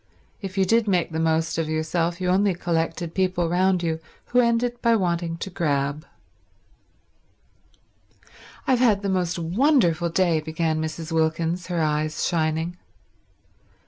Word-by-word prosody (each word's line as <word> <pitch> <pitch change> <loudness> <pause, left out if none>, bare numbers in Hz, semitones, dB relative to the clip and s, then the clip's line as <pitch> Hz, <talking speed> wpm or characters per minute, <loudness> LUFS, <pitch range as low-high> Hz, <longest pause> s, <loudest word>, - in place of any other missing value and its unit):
If 195 -1 -6
you 190 - +3
did 225 +3 +2
make 180 -4 +1
the 160 - -2
most 160 0 +1
of 160 -1 -1
yourself, 165 +2 -1
you 185 - -2
only 190 0 +2
collected 165 -1 -2
people 185 -2 0
round 180 +1 +2
you 160 -1 -1 0.3
who 250 - +3
ended 240 0 +1
by 230 -1 +4
wanting 170 -4 -1
to 195 +3 -6
grab. 145 -3 -1 2.6
"I've 255 -2 +2
had 215 -5 +3
the 200 - -1
most 180 -1 0
wonderful 175 - +2
day," 170 -2 +2
began 160 0 -1
Mrs. 160 +1 -5
Wilkins, 165 +2 0
her 175 -2 -1
eyes 155 0 -1
shining. 160 +1 -1
170 Hz, 140 wpm, -24 LUFS, 160-190 Hz, 2.6 s, by